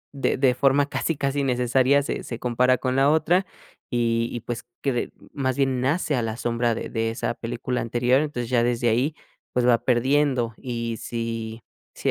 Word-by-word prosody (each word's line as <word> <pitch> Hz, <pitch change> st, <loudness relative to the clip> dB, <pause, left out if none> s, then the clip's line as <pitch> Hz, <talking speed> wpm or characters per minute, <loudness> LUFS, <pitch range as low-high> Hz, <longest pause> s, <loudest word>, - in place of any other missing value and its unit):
de 135 Hz, -, 0 dB
de 130 Hz, -1 st, +4 dB
forma 135 Hz, +2 st, +3 dB
casi 165 Hz, -, -1 dB
casi 140 Hz, 0 st, 0 dB
necesaria, 130 Hz, +2 st, +3 dB
se -, -, -3 dB
se 115 Hz, -, -6 dB
compara 125 Hz, +1 st, +2 dB
con 130 Hz, +1 st, -1 dB
la 135 Hz, +1 st, +4 dB
otra. 170 Hz, +5 st, +3 dB, 0.4 s
Y 115 Hz, -1 st, +1 dB
y 120 Hz, -, -4 dB
pues, 120 Hz, -1 st, -5 dB, 0.2 s
cre 140 Hz, -, +1 dB
de 120 Hz, -, -2 dB, 0.2 s
más 130 Hz, -2 st, -1 dB
bien 135 Hz, -2 st, +1 dB
nace 150 Hz, +2 st, +1 dB
a 125 Hz, -, +1 dB
la 115 Hz, 0 st, -3 dB
sombra 120 Hz, -1 st, 0 dB
de -, -, -5 dB
de 115 Hz, 0 st, -1 dB
esa 115 Hz, +1 st, -2 dB
película 120 Hz, +2 st, -3 dB
anterior, 120 Hz, +3 st, +2 dB
entonces 125 Hz, -6 st, -3 dB
ya 120 Hz, -2 st, +3 dB
desde 120 Hz, 0 st, +1 dB
ahí, 130 Hz, +7 st, +1 dB, 0.4 s
pues, 125 Hz, -1 st, +2 dB
va 120 Hz, -2 st, +5 dB
perdiendo. 130 Hz, -1 st, +2 dB
Y 115 Hz, -2 st, -4 dB
si, 115 Hz, -1 st, -4 dB, 0.3 s
si -, -, -1 dB
125 Hz, 190 wpm, -24 LUFS, 115-135 Hz, 0.4 s, va